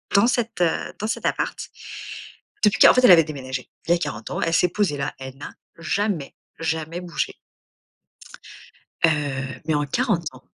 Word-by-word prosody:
dans 200 +4 +6
cet, 235 -5 -1
heu, 170 -2 0
dans 215 - -2
cet - - -3
appart. - - 0 1.1
Depuis 210 - +4
quar - - +9
en - - 0
fait 255 - +4
elle - - +9
avait 165 -2 +8
déménagé. 130 -4 -6 0.2
Il 170 - +1
y - - +8
a - - 0
40 110 -9 -5
ans, - - -2
elle 165 - 0
s'est 180 - +4
posée 180 -7 0
là, 140 +1 -3
elle 130 0 -8
n'a 145 - -8 0.3
jamais, 170 -2 -1 0.2
jamais 160 +1 -2
bougé. 165 -6 -3 1.7
Heu, 135 -5 0
mais 160 - +1
en 145 0 +1
40 200 - 0
ans 130 - -15
165 Hz, 180 wpm, -23 LUFS, 140-195 Hz, 1.7 s, quar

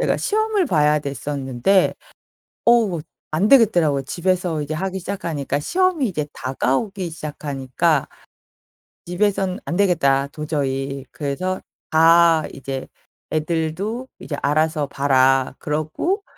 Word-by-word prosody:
제가 - - +1
시험을 430 -2 +1
봐야 150 - +3
됐었는데 140 +4 0 0.7
어 225 -8 +4 0.3
안 190 +7 +2
되겠더라고요. 175 - +4
집에서 175 +1 -1
이제 150 +2 -5
하기 190 +4 -2
시작하니까, 165 -7 -3
시험이 360 - +1
이제 155 -5 -3
다가오기 170 - -2
시작하니까 145 -1 -1 1.0
'집에선 190 +1 0
안 170 - -2
되겠다 140 -8 +3
도저히.' 140 -3 -3
그래서 180 +6 -3 0.3
다 165 0 +5
이제 135 -1 -6 0.4
"애들도 170 +10 -2
이제 145 - -5
알아서 155 0 +1
봐라. 135 -2 +2
그러고 155 - -2
155 Hz, 270 characters per minute, -21 LUFS, 140-190 Hz, 1.0 s, 다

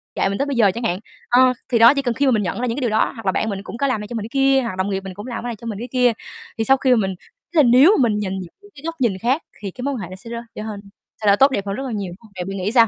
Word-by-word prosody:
dạy - - +1
mình 200 - -2
tới 280 - 0
bây 285 -1 -2
giờ 215 -5 +4
chẳng 235 - -5
hạn. 185 -5 0 0.3
Ờ, 255 +1 +5 0.2
thì 235 - +2
đó, 235 +3 +8
chỉ 280 - 0
cần 245 -3 -1
khi 280 +5 0
mà 265 - +4
mình 215 -4 +2
nhận 180 +4 -3
ra - - 0
những 230 - -1
cái - - -2
điều 245 - +1
đó 215 - +2
hoặc 225 -3 -10
là 190 - +3
bạn 220 - -1
mình 200 -1 -4
cũng 230 - -8
có 280 - +1
làm 255 -6 -1
này 210 - -7
cho 240 - -8
mình 220 - -3
cái 220 - -7
kia, 270 0 +3
hoặc 230 -6 -4
đồng 190 +2 0
nghiệp 195 - -1
mình 190 -1 -7
cũng 205 +5 -9
làm 240 -2 -5
cái 245 - -3
này 235 - -4
cho 230 +2 -10
mình 210 -3 -4
cái 240 - -5
kia 250 -2 +4 0.5
thì 225 - 0
sau 270 +4 +4
khi 260 -1 +1
mà - - +7
mình 190 - -4 0.4
tức - - -3
là 305 - +7
nếu 260 +8 +7
mà - - +2
mình 210 -1 0
nhần 190 -2 -3
nhịn 180 -2 -8 0.3
cái 280 - -13
góc 330 0 -3
nhìn 220 -7 +2
khác 255 - 0 0.2
thì 200 -2 -5
cái 250 - -10
mối 280 +1 -1
quan 255 - -4
hệ 180 - -5
nó 185 - -8
sẽ 195 +5 -11
rớ 235 - -4 0.2
trở - - -5
hên 215 -2 -6 0.4
thay 210 - -1
đổi 200 0 +6
tốt 270 +3 +5
đẹp 200 -6 -2
hơn 195 - -2
rất 270 - -4
là 255 - -4
nhiều, 200 -4 -3
đúng 175 - -11
hông, 220 -3 -18
vậy 180 - -4
bạn 195 +1 -5
nghĩ 190 +2 -1
sao? 230 -2 +6
230 Hz, 395 wpm, -21 LUFS, 200-255 Hz, 0.5 s, đó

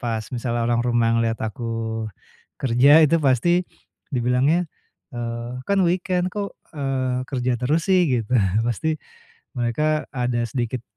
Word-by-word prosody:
pas 115 -2 -2
misalnya 120 -1 -2
orang 120 0 +1
rumah 120 -1 +2
ngelihat 115 -1 0
aku 120 +3 -7 1.0
kerja 130 +2 +3 0.2
itu 165 - +3
pasti 130 +5 +3 0.6
dibilangnya, 125 +6 +2 0.6
eee, 120 +1 -5
"Kan 200 0 +2
weekend, 180 +1 0
kok, 205 -1 -4 0.2
eee, 130 -3 -1
kerja 125 -2 0
terus 150 +6 +1
sih?" 185 -1 +5
Gitu. 115 -1 -1 0.3
Pasti 120 +6 -1 0.7
mereka 150 +6 0
ada 125 -2 0
sedikit 125 -1 -3
125 Hz, 125 wpm, -22 LUFS, 120-145 Hz, 1.0 s, sih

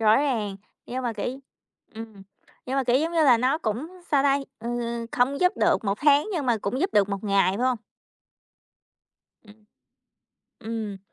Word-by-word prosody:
Rõ 215 -1 +5
ràng. 225 -9 0 0.3
Nhưng 255 +1 -4
mà 240 -2 -1
kiểu 215 - -4 0.7
ừm, 220 -3 -9 0.4
nhưng 260 +1 -2
mà, 270 - +1
kiểu 245 0 +3
giống 320 +5 0
như 330 -2 +3
là, 255 -4 +6
nó 260 +6 +1
cũng 230 +3 -3 0.2
sao 285 -3 +4
ta? 280 0 +3 0.2
Ừm, 235 0 -3
không 260 +3 +1
giúp 360 0 +4
được - - +2
một 200 0 -1
tháng, 290 +5 +4
nhưng 310 -7 -2
mà 240 -2 +3
cũng 215 +6 -3
giúp 375 +4 +1
được 200 -1 +3
một 200 0 -4
ngày, 195 -1 +2
phải 250 - 0
hông? 255 -3 +1 1.7
Ừm. 210 0 -19 1.0
Ừm. 220 -3 -5
240 Hz, 180 wpm, -25 LUFS, 215-275 Hz, 1.7 s, là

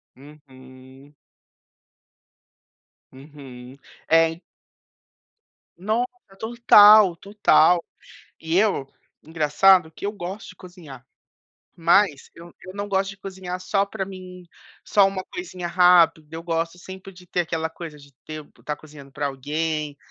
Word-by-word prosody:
Uhum. 130 -1 -17 2.0
Uhum, 135 -2 -13 0.3
é, 165 0 +4
en 165 - -17 1.4
Nossa, 220 +7 -1 0.3
total, 215 -4 +6
total. 180 -3 +3 0.6
E 160 +2 -1
eu 195 -9 +1 0.4
engraçado 160 +3 +3
que 200 - -9
eu 205 - -1
gosto 195 +1 -8
de 180 - -13
cozinhar, 160 -9 -13 0.7
mas 170 -3 +2
eu 170 +1 -14
eu 185 - -11
não 205 0 -5
gosto 195 0 -1
de 195 - -12
cozinhar 185 -2 -7
só 195 +1 0
pra 200 -1 -5
mim, 185 -1 -11 0.4
só 200 -2 +4
uma 190 -1 -4
coisinha 185 - -7
rápida. 170 -3 +4
Eu 165 +1 -8
gosto 165 0 -3
sempre 190 +2 -11
de 180 -1 -17
ter 175 - -2
aquela 160 -1 -3
coisa 160 -2 -10
de 140 -1 -18
ter 155 -1 -8
estar 150 - -5
cozinhando 145 -3 -15
pra 145 +2 -4
alguém, 150 +2 -4
170 Hz, 125 wpm, -23 LUFS, 150-190 Hz, 2.0 s, total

